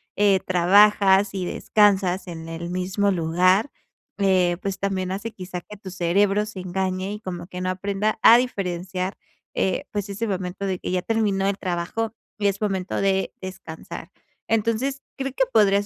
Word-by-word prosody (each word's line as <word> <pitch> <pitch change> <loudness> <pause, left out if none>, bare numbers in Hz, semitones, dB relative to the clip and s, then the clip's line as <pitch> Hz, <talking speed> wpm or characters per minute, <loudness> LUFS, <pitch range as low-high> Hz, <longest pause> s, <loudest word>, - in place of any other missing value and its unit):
eh, 200 -2 +4
trabajas 195 +2 +5
y 190 -2 -2
descansas 195 -1 +2
en 165 -2 -7
el 165 +1 -5
mismo 185 +3 0
lugar, 185 - +2 0.5
eh, 185 -3 +3
pues 195 -1 -3
también 190 -1 -2
hace 210 +4 -4
quizá 180 -2 -7
que 210 - -11
tu 200 -1 -10
cerebro 195 +3 +2
se 210 -3 -8
engañe 185 +1 -2
y 210 - -6
como 175 -4 -6
que 180 0 -7
no 185 0 0
aprenda 200 +3 -1
a 235 - +9
diferenciar, 185 -5 -2 0.4
eh, 190 - 0
pues 205 -1 -3
ese 210 +3 -3
momento 190 -1 -3
de 190 -1 -1
que - - -5
ya 180 0 +1
terminó 205 -2 0
el 200 0 0
trabajo 185 +5 -2 0.2
y 205 - +1
es 200 0 0
momento 195 -3 -2
de 190 -1 +1
descansar. 185 -4 -8 0.4
Entonces 230 +5 0
creo 270 0 -3
que 265 - +2
podrías 205 -2 +4
195 Hz, 165 wpm, -23 LUFS, 185-205 Hz, 0.5 s, a